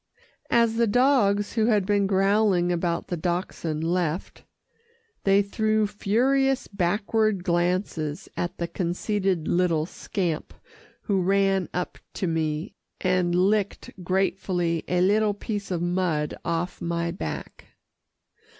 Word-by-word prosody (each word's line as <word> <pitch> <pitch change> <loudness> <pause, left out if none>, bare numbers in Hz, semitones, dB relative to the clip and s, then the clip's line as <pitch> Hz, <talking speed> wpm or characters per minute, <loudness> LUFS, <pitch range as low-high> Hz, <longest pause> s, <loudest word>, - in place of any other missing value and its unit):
As 230 -1 +3
the 235 0 +3
dogs 210 -4 +3
who 220 -1 +2
had 210 -5 +3
been 200 -1 +2
growling 195 -2 +3
about 170 -1 -1
the 175 - -1
Dachshund 170 -2 -2
left, 175 0 -2 0.8
they 195 +1 +5
threw 215 +1 +1
furious 260 +7 +1
backward 205 +1 0
glances 175 -2 -1
at 175 - -3
the 170 - -2
conceited 185 0 -1
little 170 -3 +2
scamp 175 -2 -3 0.5
who 195 -3 +1
ran 195 0 +2
up 180 0 -4 0.2
to - - -2
me, 160 +1 -1 0.3
and 180 -2 +1
licked 200 +2 +1
gratefully 180 -2 0
a 180 0 +1
little 205 +2 +3
piece 205 -1 -4
of 175 -2 -1
mud 175 -4 0
off 170 +2 -2
my 170 0 -1
back. 180 - -6
185 Hz, 120 wpm, -25 LUFS, 175-205 Hz, 0.8 s, they